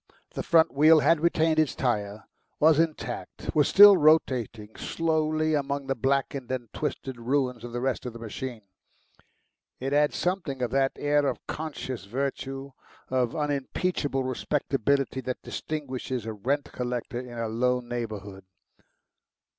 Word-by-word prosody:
The - - -4
front 165 -1 +4
wheel 155 +2 +6
had 165 +1 +4
retained 160 -1 +2
its 155 -3 +1
tyre, 105 -4 -1 0.4
was 155 0 +5
intact, 165 -2 -3
was 150 -2 +4
still 205 0 +9
rotating 130 - +2
slowly 155 -1 0
among 140 -1 -1
the 135 - 0
blackened 135 0 -1
and 120 -4 -4
twisted 135 -4 -4
ruins 125 -1 -1
of 120 - -7
the 120 +1 -3
rest 130 -1 -1
of 120 - -6
the - - -8
machine. 115 0 -6 1.2
It 135 +2 -2
had 150 0 +3
something 170 -8 -2
of 120 - -1
that 135 0 +2
air 145 0 +1
of - - -3
conscious 130 - -5
virtue, 135 +3 -4 0.4
of 125 -1 0
unimpeachable 145 0 -1
respectability, 135 0 0
that 125 0 -5
distinguishes 130 -5 -4
a 110 - -4
rent 135 +8 -2
collector 125 0 -3
in 125 -1 -8
a 115 -1 -2
low 125 +3 +1
neighbourhood. 105 -6 -6
135 Hz, 140 wpm, -27 LUFS, 120-150 Hz, 1.2 s, still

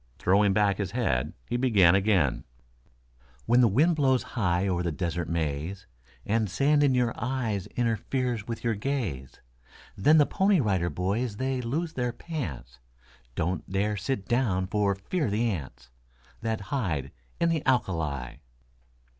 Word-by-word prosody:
Throwing 100 +2 +3
back 100 0 +2
his 100 -4 -1
head 90 - 0
he 120 - -1
began 105 -9 +5
again: 95 - +2 1.0
When 125 +1 +4
the 120 - +6
wind 150 - +3
blows 130 -3 +3
high 95 -4 +1
o'er 90 -2 0
the 85 -1 -1
Desert 85 +2 -3
Maze, 80 +4 -3 0.4
And 110 -1 0
sand 145 - +2
in 140 -3 +3
your 120 -2 +1
eyes 120 -6 -2
interferes 120 -1 -1
with 115 -1 -5
your 115 -1 +1
gaze, 100 - -3 0.6
Then 150 +11 +4
the 150 - +6
Pony 195 +2 +2
Rider 95 - +1
Boys 100 +7 -2
they 130 0 -1
lose 155 +8 -2
their 125 -3 -1
pants; 70 - -6 0.6
Don't 90 +1 -2
dare 105 +2 0
sit 100 +1 -3
down 110 -7 +1
for 100 0 +1
fear 150 - -2
of 105 - -1
the 115 +3 +1
ants 65 -8 -7 0.5
That 110 -2 -2
hide 80 - -1 0.3
in 170 - +2
the 160 -3 0
alka 125 -7 +2
li. 70 -7 -4
105 Hz, 155 wpm, -27 LUFS, 90-125 Hz, 1.0 s, the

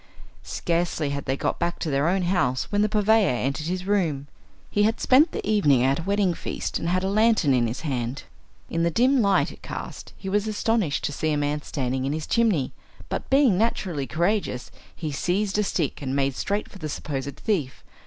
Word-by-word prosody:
Scarcely 165 -3 -1
had 140 -1 -4
they 135 0 -1
got - - -1
back 175 - -1
to 160 - -3
their 140 +3 +2
own 190 +1 +1
house 175 -9 0
when 205 0 +2
the 210 - +2
purveyor 215 0 +3
entered 140 +6 -2
his 180 +1 -3
room. 170 -9 0 0.5
He 205 - +1
had 220 +2 +2
spent 280 +6 +5
the - - -5
evening 150 - +4
at 135 +3 +2
a - - -2
wedding 195 0 +1
feast, - - -4
and 165 - -2
had 185 +1 +1
a - - 0
lantern 215 -7 +3
in 120 -2 +2
his 115 +3 -4
hand. 130 -4 -3 0.4
In 165 - -2
the 170 - +3
dim 255 - +3
light 200 -2 +2
it - - -14
cast - - -7
he 195 - -8
was 205 +2 +1
astonished 215 -6 0
to - - -1
see 155 +2 -1
a 150 - +1
man 145 +1 -1
standing 130 -3 -2
in 140 - -1
his 155 0 -3
chimney, 215 - +1 0.4
but - - -4
being 270 -9 +4
naturally 180 - -1
courageous 170 -6 -1 0.2
he 155 -3 -4
seized 195 +7 0
a - - +3
stick 165 -8 -2
and 135 -1 -2
made 135 -1 +1
straight 205 +8 -2
for 195 - -13
the 155 -3 -4
supposed 140 -2 -4
thief. 160 - -2
170 Hz, 210 wpm, -25 LUFS, 140-205 Hz, 0.5 s, spent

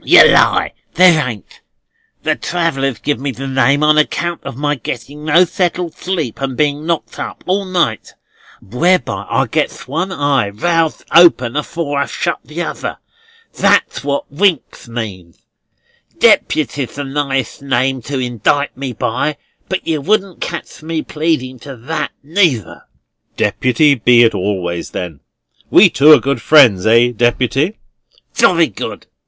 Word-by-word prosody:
"Yer - - +7
lie, - - +3 0.2
there 165 -6 +5
ain't. 105 -5 -11 0.6
The - - +1
travellers 135 -8 -2
give 145 +6 -2
me 140 +1 -3
the 135 +1 -6
name 135 +2 +1
on 155 0 +4
account 170 +2 -1
of - - -8
my 145 +1 0
getting 140 +3 -7
no 165 +4 +4
settled 175 -1 -2
sleep 165 - -4
and 135 -2 -3
being 150 +1 -1
knocked 170 -2 -3
up - - -7
all 195 +2 -1
night; 175 - -2 0.5
whereby 120 - 0
I - - +1
gets - - -3
one 165 +8 -3
eye 145 - 0
roused 165 +8 -1
open 150 -8 +5
afore 150 -1 -3
I've 140 - -2
shut 170 -4 -2
the 165 +3 -5
other. - - -5 0.6
That's - - +1
what 140 0 -3
Winks 170 -4 -1
means. 100 -8 -7 0.8
Deputy's 135 -3 +1
the 145 - -4
nighest 135 -3 -3
name 130 -1 0
to 140 +4 -5
indict 125 +3 -1
me 135 -1 -5
by: 130 +7 -2 0.3
but 190 - -3
yer 155 -3 -1
wouldn't 195 +1 -1
catch 170 -1 -6
me 160 0 -3
pleading 150 -5 -2
to 140 0 -10
that, 155 +7 -4
neither." 150 - 0 0.5
"Deputy 140 +4 +2
be 120 -1 +4
it 115 - +3
always, 90 -3 -3
then. 85 -6 -6 0.5
We - - +6
two 140 +7 +5
are - - +8
good 140 -3 -2
friends; 120 -11 +5
eh, 115 +2 +4
Deputy?" 130 - 0 0.6
"Jolly - - +4
good." - - -7
140 Hz, 145 wpm, -16 LUFS, 120-160 Hz, 0.8 s, are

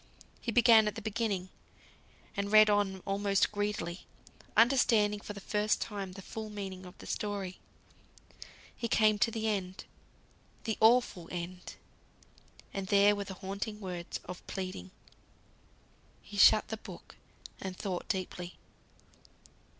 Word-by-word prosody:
He 235 - -2
began 230 -2 +6
at 210 - -2
the 225 - -6
beginning, 205 -4 -2 0.9
and 200 0 -2
read 215 0 +8
on 195 -2 +1
almost 195 0 +1
greedily, 205 -4 -3 0.5
understanding 225 -4 +4
for 205 - -7
the 200 - -8
first 210 +2 0
time 200 -4 -5
the 195 0 -10
full 220 +2 -6
meaning 190 -3 -6
of 180 - -14
the - - -12
story. 200 -3 -3 1.2
He 235 - -3
came 215 -2 +3
to 230 - +3
the 220 -1 -2
end; 190 -3 -2 0.8
the 220 -2 -1
awful 220 -7 +4
End. 180 +1 -6 1.0
And 195 -1 -4
there 200 +1 +5
were 200 0 -4
the 190 -1 -7
haunting 205 +2 -4
words 180 -3 -5
of 180 - -8
pleading. 185 - -5 1.3
He - - -11
shut - - +6
the - - -3
book, - - -12 0.5
and 190 -1 -5
thought 185 -4 -4
deeply. 180 -2 -4
200 Hz, 135 wpm, -31 LUFS, 185-215 Hz, 1.3 s, read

